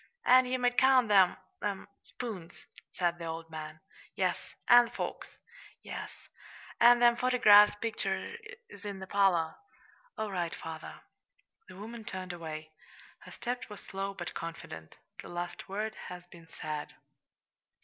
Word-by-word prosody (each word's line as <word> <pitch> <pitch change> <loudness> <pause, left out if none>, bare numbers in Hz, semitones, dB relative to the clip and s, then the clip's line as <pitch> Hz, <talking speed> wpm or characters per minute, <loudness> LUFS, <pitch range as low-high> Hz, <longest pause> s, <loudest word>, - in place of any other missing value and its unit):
"An' 255 0 +7
ye 255 +1 0
might 245 -1 +2
count 260 -4 +5
'em 190 -3 +6 0.3
them 200 -2 -3
spoons," 195 -8 -8 0.3
said 175 -1 0
the 170 - -5
old 165 0 -6
man. 155 0 -7 0.3
"Yes." - - +1 0.3
"An' 240 0 +8
the - - -9
forks." - - -5 0.5
"Yes." - - -6 0.7
"An' 240 +1 +8
them 240 0 +5
photygraph 210 -5 +6
pictures 210 -4 -3 0.4
in 200 -2 -5
the 190 - -7
parlor." 185 -5 +2 0.6
"All 215 -1 -3
right, 175 -3 -2
father." 160 -1 -8 0.7
The - - -11
woman 225 +3 -8
turned 185 -3 -6
away. 155 -2 -7 0.5
Her - - -13
step 245 -1 -4
was 210 - -8
slow, 195 +1 -5
but 175 -1 -6
confident 80 - -8 0.2
the - - -11
last 175 +1 -5
word 215 +3 -2 0.2
had 180 0 -9
been 170 -1 -14
said. 155 -2 -6
195 Hz, 140 wpm, -31 LUFS, 170-230 Hz, 0.7 s, An